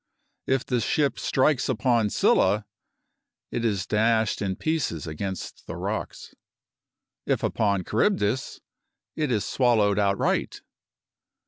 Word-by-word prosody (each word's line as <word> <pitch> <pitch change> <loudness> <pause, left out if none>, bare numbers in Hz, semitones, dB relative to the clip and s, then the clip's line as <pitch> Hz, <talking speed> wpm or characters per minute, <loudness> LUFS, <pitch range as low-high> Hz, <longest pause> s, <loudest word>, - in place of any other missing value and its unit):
If 130 -1 +1
the 125 -2 0
ship 145 +4 0
strikes 135 0 +1
upon 115 -2 +2
Scylla, - - +2 0.9
it 120 - -2
is 100 -6 0
dashed 110 0 +1
in 95 -2 -1
pieces 140 - -2
against 95 +4 -6
the - - -5
rocks; - - -5 0.9
if - - 0
upon 100 -4 +1
Charybdis, 115 - 0 0.5
it 150 -4 -1
is 105 -3 0
swallowed 110 -6 +2
outright. 100 -1 0
110 Hz, 110 wpm, -25 LUFS, 100-130 Hz, 0.9 s, upon